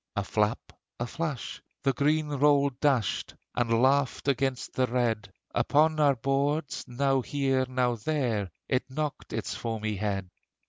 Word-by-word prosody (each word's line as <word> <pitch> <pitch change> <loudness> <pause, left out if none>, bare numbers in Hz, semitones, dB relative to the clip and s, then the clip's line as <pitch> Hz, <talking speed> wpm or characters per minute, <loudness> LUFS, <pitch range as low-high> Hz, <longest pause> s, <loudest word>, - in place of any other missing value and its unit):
A - - 0
flap, - - -1 0.3
a 120 - -1
flash, 145 0 -4 0.2
the 135 -1 +3
green 150 +3 +1
roll 140 0 +4
dashed, 125 - 0 0.2
And 115 0 +2
laughed 135 +1 +2
against 135 -1 0
the 130 -1 +2
red; 115 -5 0 0.2
Upon 155 +2 +3
our 145 -2 +5
boards, 140 +4 0
now 135 +1 +1
here, 135 -1 0
now 125 -1 +1
there, 115 -5 -1 0.2
It 130 0 0
knocked 150 +2 -4
its - - -3
foamy 110 -2 -3
head. 95 -2 -2
135 Hz, 140 wpm, -28 LUFS, 120-145 Hz, 0.3 s, our